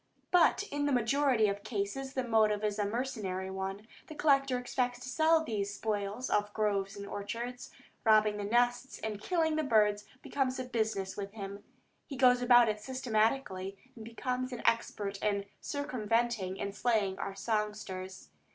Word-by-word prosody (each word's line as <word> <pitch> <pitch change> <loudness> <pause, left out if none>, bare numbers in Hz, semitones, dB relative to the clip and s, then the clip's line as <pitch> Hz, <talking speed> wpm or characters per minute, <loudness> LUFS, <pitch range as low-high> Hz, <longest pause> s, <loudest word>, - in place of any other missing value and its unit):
But 360 +2 +5
in 290 0 0
the - - +1
majority 250 -2 +3
of 200 0 -3
cases 245 +6 -3
the 260 - 0
motive 215 -3 +2
is 210 0 -1
a 205 - +2
mercenary 205 -5 -3
one; 190 +2 -4 0.2
the 310 - -9
collector 275 -3 +3
expects 245 0 -1
to 255 - -6
sell 320 +4 +4
these 205 -6 -2
spoils 210 +3 -2
of 205 - +2
the 205 - -24
groves 200 -2 0
and 200 - -6
orchards. 230 +5 -5 0.3
Robbing 215 -2 +4
the 205 - -3
nests 245 +4 +1
and 215 -2 -3
killing 320 - +1
birds 210 -3 +3 0.2
becomes 260 -2 -1
a 255 - -2
business 220 -6 -2
with 200 0 -6
him. 200 -1 -7 0.4
He 275 - -6
goes 250 -1 +5
about 245 -1 +6
it 210 -1 -1
systematically, 220 -5 -1 0.2
and 225 - -9
becomes 250 +3 -3
expert 210 -3 0
in 200 -1 0
circumventing 230 -8 -1
and 200 - -3
slaying 205 -4 0
our 195 - -4
songsters. 210 -4 -3
220 Hz, 160 wpm, -32 LUFS, 200-255 Hz, 0.4 s, about